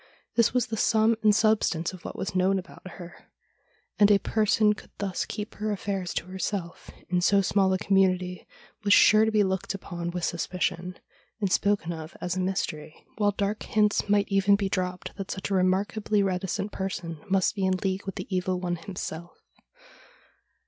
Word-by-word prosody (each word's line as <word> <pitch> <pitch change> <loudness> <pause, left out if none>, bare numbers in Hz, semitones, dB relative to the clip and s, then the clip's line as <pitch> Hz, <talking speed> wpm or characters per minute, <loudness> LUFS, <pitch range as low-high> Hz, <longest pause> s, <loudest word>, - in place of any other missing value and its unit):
This 230 -2 +4
was 250 -1 +1
the 225 -2 -4
sum 220 +1 +3
and 210 -1 +4
substance 210 -6 +2
of 185 - -11
what - - -7
was 190 - -4
known 185 +1 +2
about 185 0 -9
her; 175 -2 -12 0.7
and 205 -1 +6
a 205 - +6
person 215 +1 +2
who - - +4
could - - -14
thus 195 -2 -2
keep 210 0 -6
her 215 +1 -3
affairs 195 -2 -3
to - - -2
herself 185 -1 -4 0.2
in 180 -1 +1
so 200 +2 +4
small 190 0 +2
a 185 - +2
community 185 -2 +1 0.4
was 205 0 +6
sure 215 +1 +6
to 220 - +1
be 215 -1 +4
looked 190 +1 -2
upon 175 -3 -5
with 175 0 -4
suspicion, 180 +1 -2 0.4
and 200 -3 -1
spoken 195 -5 +1
of 160 0 -9
as 180 0 -2
a - - -2
mystery, 180 -5 -3
while 205 -1 +3
dark 205 +1 -2
hints 210 -1 +1
might 205 -1 +3
even 195 0 +4
be 200 -1 -1
dropped 180 -1 -3
that 195 -1 -6
such 190 +1 -4
a - - +1
remarkably 200 +3 +1
reticent 195 +2 -2
person 175 -4 -4
must 190 -1 +2
be 200 -3 -3
in 190 0 +2
league 190 +1 -2
with 195 - -4
the - - -5
Evil 185 0 0
One 175 -1 -2
himself. 170 -2 -7
190 Hz, 185 wpm, -27 LUFS, 180-205 Hz, 0.7 s, and